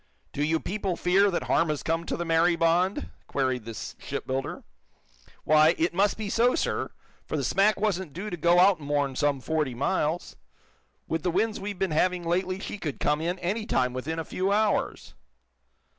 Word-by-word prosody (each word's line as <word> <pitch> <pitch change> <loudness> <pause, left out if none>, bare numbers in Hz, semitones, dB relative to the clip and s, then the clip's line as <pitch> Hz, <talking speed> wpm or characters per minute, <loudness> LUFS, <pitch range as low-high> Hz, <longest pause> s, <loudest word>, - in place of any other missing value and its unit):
"Do 145 - -1
you 160 +2 +1
people 195 -1 -2
fear 195 +4 +3
that 175 - -1
harm 165 - +2
has 150 -2 -2
come 165 +1 -1
to - - -2
the 175 - -3
'Mary 165 +1 +3
Bond!" 170 +4 +1 0.2
queried 130 -4 -1
the 115 -1 -7 0.2
shipbuilder. 130 0 -4 0.8
"Why, 155 +2 +5
it 165 +2 +1
must 200 +3 +2
be 215 -1 -4
so, 235 +4 +3
sir. - - -1 0.4
For - - -2
the - - -1
smack 200 +2 +2
wasn't 190 -6 -1
due 190 +7 -6
to - - -2
go 170 +2 +3
out 185 0 +5
more'n 145 -2 -1
some 145 -1 +1
forty 150 -4 -1
miles. 155 +4 -1 0.7
With 165 0 -1
the 180 - 0
winds 215 +5 0
we've 200 0 -5
been 190 -2 -1
having 180 +3 +1
lately 185 +2 -1
she 205 - -6
could 150 -7 -4
come 150 +1 +1
in, 175 +3 -1
any 195 +5 -2
time, 125 0 +1
within 140 +6 -4
a 165 - -3
few 190 +2 -1
hours." 210 0 0
170 Hz, 190 wpm, -27 LUFS, 150-190 Hz, 0.8 s, Why